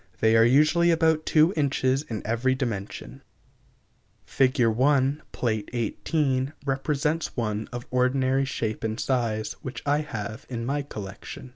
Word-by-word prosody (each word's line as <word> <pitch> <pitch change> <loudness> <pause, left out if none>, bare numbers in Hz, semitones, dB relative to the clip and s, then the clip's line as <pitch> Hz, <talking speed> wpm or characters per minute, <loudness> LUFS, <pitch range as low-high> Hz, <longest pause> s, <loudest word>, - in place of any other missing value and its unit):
They 110 0 +4
are 115 - +6
usually 155 +8 +4
about 160 -1 +2
two 160 +4 +4
inches 135 -2 +1
in 110 -8 -6
every 120 +4 +1
dimension. 115 -7 -5 1.0
Fig. 130 -2 +2
1, 135 +5 +2
Pl. 120 - -1 0.2
XVIII 130 +3 -1
represents 150 +3 -1
one 110 -2 -2
of 120 0 -6
ordinary 130 +1 +2
shape 110 -5 -3
and 110 +1 -2
size, 110 -4 -1
which 130 - -7
I 145 +1 +2
have 115 -7 -6
in 115 -2 -4
my 145 +3 -1
collection. 105 -1 -8
130 Hz, 135 wpm, -26 LUFS, 115-145 Hz, 1.0 s, are